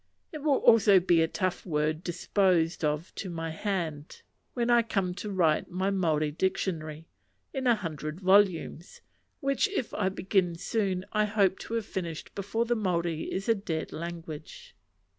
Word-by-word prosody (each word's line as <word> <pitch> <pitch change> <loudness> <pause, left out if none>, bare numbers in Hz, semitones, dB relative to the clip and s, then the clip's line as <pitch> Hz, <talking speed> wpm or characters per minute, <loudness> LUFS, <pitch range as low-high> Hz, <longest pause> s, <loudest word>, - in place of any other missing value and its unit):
It 310 - -6
will 285 -2 +2
also 205 -4 +6
be 175 -2 +3
a 165 - +3
tough 185 +1 -2
word 155 -1 -1
disposed 175 -2 +1
of 150 +3 -1
to 190 - -5
my 165 -1 -4
hand, 160 -5 -4 0.3
when 240 -1 +1
I 240 0 +6
come 195 -5 -1
to 200 +3 -6
write 165 -5 +2
my 190 +2 -1
Maori 155 -6 +1
dictionary, 165 -3 -2 0.5
in 265 -2 -1
a 240 - +6
hundred 155 -4 -5
volumes; 190 -3 +2 0.4
which, 275 +7 +2
if 380 - -3
I 190 -3 +1
begin 185 -2 0
soon, 190 0 -1
I 210 0 +3
hope 200 -3 +2
to 230 - -5
have 225 -2 -1
finished 170 -5 -5
before 205 +4 -1
the 240 0 +1
Maori 170 -6 -1
is 195 +1 -3
a 230 - +5
dead 170 -7 -4
language. 170 - -8
185 Hz, 160 wpm, -29 LUFS, 165-210 Hz, 0.5 s, also